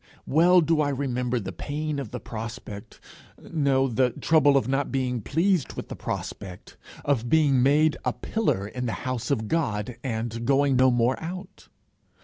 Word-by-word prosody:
Well 175 +5 +5
do 160 -1 +2
I 145 - +1
remember 125 -3 -1
the 95 -3 -5
pain 145 - -4
of 135 -6 -5
the - - -6
prospect 115 -3 -8 0.4
no, 140 -4 +1
the 125 +1 +2
trouble 145 +1 +3
at 135 - 0
not 135 +2 0
being 125 -3 -1
pleased 165 - +1
with - - -7
the - - -5
prospect 90 -3 -6 0.3
of 120 -4 0
being 145 -5 +4
made 150 +4 +3
a - - +1
pillar 100 - -1
in 125 +3 -4
the 115 - -2
house 130 -3 -3
of 110 -6 0
God, 110 -6 -1
and 115 -2 -3
going 135 +2 +3
no 130 +1 +5
more 120 +1 +1
out! 180 +3 -8
130 Hz, 165 wpm, -26 LUFS, 120-150 Hz, 0.4 s, Well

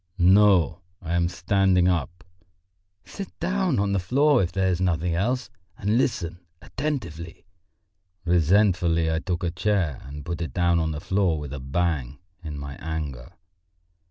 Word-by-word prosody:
"No, 95 -2 +4 0.2
I 85 -2 -4
am 85 0 +2
standing 90 0 +2
up." 90 0 -1 0.8
"Sit 195 -3 -9
down 185 -4 0
on 100 0 +1
the 100 - +1
floor 135 +9 +3
if 90 -1 -1
there 95 +2 0
is 90 -1 0
nothing 85 -1 0
else, 120 +9 -1 0.3
and 105 +3 0
listen 90 - 0 0.2
attentively." 125 - -5 0.8
Resentfully 85 -1 +3
I 80 - 0
took 85 +1 -3
a 85 - 0
chair 90 -5 0
and 70 +1 -9
put 85 0 -4
it 85 - -5
down 85 -2 +3
on 80 -1 0
the 75 -1 -4
floor 95 -4 +1
with 75 -2 -6
a 70 - -5
bang, 70 -1 -2 0.3
in 75 -3 -6
my 70 -1 -7
anger. 75 -3 -5
90 Hz, 155 wpm, -25 LUFS, 80-100 Hz, 0.8 s, No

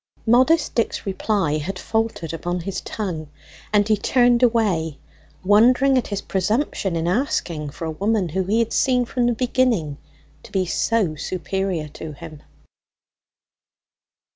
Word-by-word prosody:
Modest 260 +8 +4
Dick's 230 - -1
reply 195 -5 0
had 185 +6 -4
faltered 220 -6 -2
upon 175 +2 -3
his 190 +2 -4
tongue, 170 -8 -5 0.4
and 205 -1 +3
he 215 - +4
turned 245 +3 +3
away 200 - +1 0.5
wondering 245 +7 +5
at 255 - +1
his 200 -1 -4
presumption 195 - -1
in 165 0 -1
asking 175 - -1
for 165 - -7
a 160 - -2
woman 200 +2 0
whom 185 +3 -2
he 215 +3 +2
had 230 -1 0
seen 250 -2 +2
from 240 0 0
the 240 - +2
beginning 235 - 0 0.4
to - - -15
be 190 -2 0
so 200 -1 0
superior 185 0 -3
to 155 +1 -8
him. 155 0 -11
195 Hz, 140 wpm, -22 LUFS, 165-230 Hz, 0.5 s, wondering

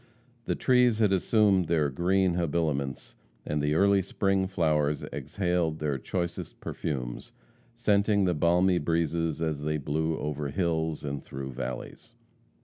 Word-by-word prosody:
The - - 0
trees 125 -3 +3
had 105 -3 +3
assumed 95 -2 +3
their 75 -4 +1
green 90 +4 +2
habiliments, 75 -5 -1 0.3
and 75 0 -1
the 75 +1 +1
early 100 +2 +4
spring 95 0 0
flowers 75 -5 +1
exhaled 80 +2 -1
their 75 -3 -2
choicest 85 -2 -4
perfumes, 65 -6 -5 0.4
scenting 105 -3 +2
the 90 - +2
balmy 90 +3 +3
breezes 80 0 0
as 75 -3 -2
they 75 +1 -1
blew 80 +3 -1
over 75 -1 -3
hills 80 -1 -1
and 70 -1 -4
through 65 0 -6
valleys. 65 - -7
80 Hz, 135 wpm, -28 LUFS, 75-95 Hz, 0.4 s, early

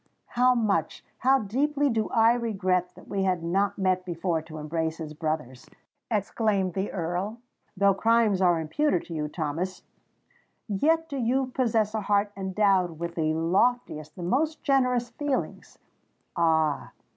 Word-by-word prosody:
how 250 +1 +3
much—how 220 - +1
deeply 280 +6 0
do 225 -4 0
I 225 0 +4
regret 185 -6 -1
that - - -15
we 200 -1 -2
had 185 -3 0
not 195 +4 0
met 185 -2 +1
before 170 -2 -2
to 155 0 -10
embrace 160 +1 -3
as 155 -2 -6
brothers!" 155 -5 -4 0.4
exclaimed 205 -3 0
the 190 +2 -2
Earl. 180 +5 -3 0.4
"Though 200 +1 +4
crimes 225 -1 +2
are 175 -3 +4
imputed 175 - 0
to 170 - -8
you, 150 -2 -2
Thomas,—yet 190 - -4
do 280 -3 -5
you 255 +2 0
possess 225 -4 +1
a 220 - -1
heart 205 0 +1
endowed 190 -3 +1
with 170 +1 -4
the 155 -2 0
loftiest—the 170 -2 0
most 300 - 0
generous 250 -4 +2
feelings! 285 +2 -3 0.6
Ah! 160 -3 +1
195 Hz, 135 wpm, -27 LUFS, 170-235 Hz, 0.6 s, I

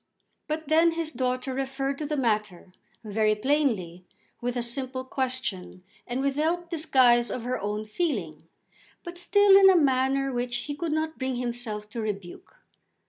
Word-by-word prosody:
But 310 0 -3
then 325 +2 +4
his 330 -1 -3
daughter 255 0 -2
referred 270 +1 -2
to 300 - -3
the 300 0 -2
matter, 210 -7 -1 0.3
very 215 0 +1
plainly, 210 - 0 0.4
with 245 +1 -2
a 240 - 0
simple 255 +2 -4
question, 255 -9 -4 0.2
and 245 +2 -2
without 320 +5 0
disguise 255 -7 +4
of 230 - -4
her 250 +1 -2
own 210 +1 -3
feeling, 210 - -3 0.6
but 350 -1 -7
still 400 +3 +5
in 390 -1 +8
a 375 - +6
manner 270 -2 +2
which 245 0 -2
he 290 - -4
could 325 +2 -3
not 315 +1 -2
bring 260 -1 -1
himself 240 -3 -4
to 235 0 -4
rebuke. 210 - -6
260 Hz, 155 wpm, -27 LUFS, 225-305 Hz, 0.6 s, in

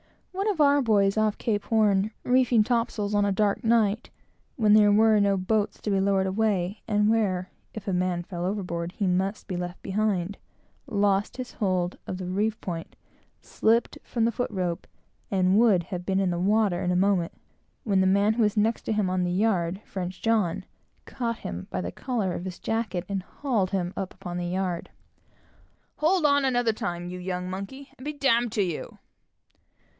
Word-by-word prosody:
One 390 +2 -2
of 390 -6 -2
our 285 -1 +5
boys, 200 -5 +3
when 215 0 +3
off 215 - -1
Cape 210 -3 -1
Horn, 210 -2 +2
reefing 250 -3 +4
topsails 230 -3 -1
of 205 0 +3
a 200 - +2
dark 200 +1 +1
night, 225 -1 +2 0.5
and 235 - -4
when 210 -1 +6
there 210 -1 +6
were 215 +1 +5
no 200 -1 +3
boats 205 +3 0
to 210 - -3
be 195 - +2
lowered 195 0 +2
away, 195 -1 0
and 210 -1 +2
where, 195 -5 +1 0.2
if 215 -2 -7
a 195 - 0
man 180 -1 0
fell 175 -1 -6
overboard 180 -3 -3
he 205 - -2
must 190 +3 -1
be 185 - -3
left 175 0 -5
behind, 200 -2 -1 0.5
lost 200 0 +1
his 255 -1 -5
hold 185 -4 -1
of 185 - -4
the 185 - -5
reef 210 +4 -1
point, 165 -3 -6 0.5
slipped 230 +2 +1
from 230 -2 -1
the 230 - +2
foot 245 +2 -2
rope, 180 -4 -3 0.4
and 190 +1 +3
would 210 -7 +4
have 180 0 -6
been 190 0 +1
in 190 -2 +1
the 175 - -2
water 200 -1 +2
in 180 - 0
a - - +1
moment, 185 -2 +2 0.5
when 195 -4 +2
the 190 - +3
man 200 +3 +3
who 235 - 0
was 210 0 +1
next 220 +2 +2
to - - -1
him 210 -3 +1
on 185 0 0
the 175 - 0
yard 190 -2 0 1.2
caught 230 -2 -3
him 85 +1 -6
by - - -3
the 90 -1 -3
collar 220 - -2
of 175 - -5
his 185 -2 -6
jacket, 220 -5 -2
and 195 -1 -2
hauled 215 -2 -1
him 185 -2 -2
up 190 -1 -5
upon 175 0 -6
the 175 0 -2
yard, 180 -1 -2
with - - -35
"Hold 330 +2 +2
on, 285 -1 +4
another 245 -4 +2
time, 175 -4 -4
you 180 - -6
young 180 0 -3
monkey, 200 +9 -7
and 255 - -12
be 300 - -3
d 280 -2 -1
d 240 0 -2
to 210 -1 0
you!" 175 -4 -5
200 Hz, 195 wpm, -26 LUFS, 185-220 Hz, 1.2 s, when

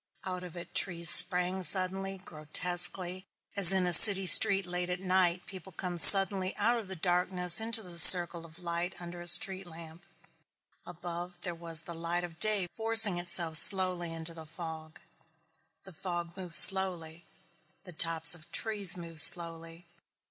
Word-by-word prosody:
Out 180 -1 -12
of 180 -1 -17
it 175 - -17
trees 170 -2 -3
sprang 180 +1 -1
suddenly, 190 +1 -1
grotesquely, 180 +2 -3 0.3
as 195 -3 +5
in 190 -1 -4
a 175 - -5
city 195 +2 +4
street 195 0 +3
late 180 0 -10
at 180 0 -10
night 185 -1 -6
people 190 0 -17
come 175 0 -11
suddenly 195 0 +2
out 235 +3 -6
of 215 - -16
the 190 - -12
darkness 180 +2 -2
into 225 0 -7
the 175 -2 -7
circle 175 -2 +7
of 165 -1 -17
light 175 +1 -11
under 175 0 -16
a 175 - -10
street 185 +2 +1
lamp. 165 0 -18 0.8
Above 175 +1 -14
there 175 - -11
was 165 -1 -5
the 170 - -14
light 170 +1 -10
of 170 -2 -16
day 210 -4 -4
forcing 225 -5 0
itself 175 -2 -3
slowly 185 -2 0
into 165 0 -10
the 160 -1 -17
fog. 160 -1 -16 0.8
The 190 - -18
fog 175 0 -12
moved 180 -3 -10
slowly. 170 -1 +4 0.6
The 180 - -16
tops 165 0 -3
of 165 -2 -20
trees 205 -5 -6
moved 165 -2 -2
slowly. 165 0 -1
175 Hz, 160 wpm, -23 LUFS, 170-190 Hz, 0.8 s, circle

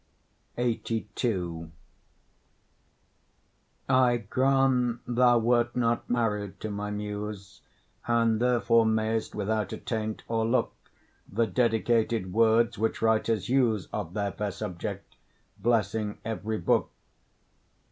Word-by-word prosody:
LXXXII 105 -7 -2 2.2
I 130 -2 +4
grant 125 +1 +1
thou 120 0 +4
wert 120 +1 +2
not 120 -1 0
married 105 -5 -1
to 110 - -4
my 105 0 -4
Muse, 105 -1 -6 0.5
And 115 -1 +2
therefore 115 -2 +3
mayst 110 0 0
without 105 -1 -1
attaint 110 -2 -4
o'erlook 115 +2 +1 0.6
The 115 +4 +2
dedicated 115 -3 +1
words 115 +1 +3
which 110 0 -1
writers 110 -2 +1
use 120 -6 +2
Of 95 -3 -4
their 100 -1 -1
fair 105 +2 -3
subject, 100 -2 -6 0.4
blessing 110 -2 0
every 110 -1 -3
book. 85 - +1
110 Hz, 95 wpm, -28 LUFS, 105-120 Hz, 2.2 s, I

